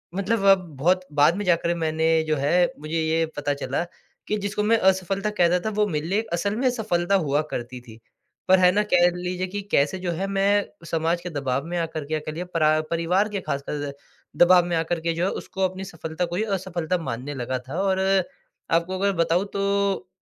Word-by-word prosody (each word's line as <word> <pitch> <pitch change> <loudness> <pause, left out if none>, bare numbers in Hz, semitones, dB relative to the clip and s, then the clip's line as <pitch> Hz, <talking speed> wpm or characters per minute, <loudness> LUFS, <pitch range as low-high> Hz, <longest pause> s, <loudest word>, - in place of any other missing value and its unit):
मतलब 200 +2 0
अब 195 -1 +7 0.2
बहुत 180 +7 +2 0.2
बाद 150 +4 +5
में 205 - -2
जाकर 170 -1 +2
मैंने 160 -1 -1 0.2
जो 155 - +2
है 140 +1 0 0.3
मुझे 155 +2 -3
ये 160 +1 +1
पता 145 0 -1
चला 140 +2 -2 0.4
कि 210 - 0
जिसको 205 +1 -1
मैं 225 +2 +4
असफलता 190 +2 -1
कह 175 - +6
रहा 180 +1 +2
था - - +1
वो 210 - +4
मेरे 155 -4 -2
लिए 200 +5 +1
असल 200 +4 0
में 255 +3 +2
सफलता 200 -6 0
हुआ 145 +1 +2
करती 125 +1 -5
थी। 115 -2 -14 0.5
पर 190 0 +6
है 180 0 +6
ना 205 +3 +2
कह 175 0 +6
लीजिए 180 +1 -3
कि 205 +2 -4
कैसे 145 +6 +2
जो 175 - 0
है 185 +4 -2
मैं 200 +1 +2 0.3
समाज 165 +1 0
के 180 - -5
दबाव 140 -3 -2
में 175 +1 -3
आकर 160 -2 -3
क्या 155 +1 -2
कर 155 0 -6
लिया, 175 +3 -5
परा 155 -3 +2
परिवार 180 +5 +1
के 205 -1 -3
खासकर 140 -1 -4 0.5
दबाव 180 0 +6
में 175 -1 -1
आकर 165 +1 -1
के 165 0 0
जो 170 +2 -1
है - - +1
उसको 190 0 -3
अपनी 185 +1 -8
सफलता 165 -1 -4
को - - -1 0.2
असफलता 180 -2 -2
मानने 130 +1 -4
लगा 130 0 -3
था। 165 - -3
और 190 -1 +1 0.7
आपको 170 +3 +1
अगर 200 +1 +2
बताऊँ 175 +4 +1
तो 200 -1 0
175 Hz, 210 wpm, -24 LUFS, 155-190 Hz, 0.7 s, अब